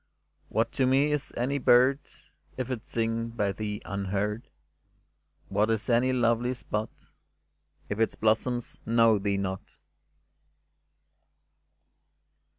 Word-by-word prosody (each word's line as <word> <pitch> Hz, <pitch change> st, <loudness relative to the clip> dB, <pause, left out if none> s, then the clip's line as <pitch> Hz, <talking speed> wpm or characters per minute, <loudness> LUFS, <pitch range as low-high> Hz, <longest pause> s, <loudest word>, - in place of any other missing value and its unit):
What 115 Hz, +1 st, 0 dB
to 130 Hz, -, +1 dB
me 140 Hz, +3 st, +3 dB
is 150 Hz, -2 st, -2 dB
any 140 Hz, +4 st, 0 dB
bird, 130 Hz, +2 st, +5 dB, 0.6 s
If 130 Hz, 0 st, -3 dB
it 120 Hz, -3 st, -5 dB
sing 115 Hz, 0 st, -1 dB
by 105 Hz, -4 st, -1 dB
thee 105 Hz, +1 st, -5 dB
unheard? 100 Hz, +3 st, -2 dB, 1.0 s
What 105 Hz, +3 st, +1 dB
is 115 Hz, +2 st, 0 dB
any 120 Hz, +2 st, +3 dB
lovely 120 Hz, 0 st, +1 dB
spot, 110 Hz, -2 st, -3 dB, 1.0 s
If 105 Hz, -, -4 dB
its 115 Hz, -, +1 dB
blossoms 115 Hz, +2 st, 0 dB
know 115 Hz, -2 st, +4 dB
thee 100 Hz, 0 st, 0 dB
not? 95 Hz, -1 st, -4 dB
115 Hz, 110 wpm, -28 LUFS, 105-125 Hz, 1.0 s, bird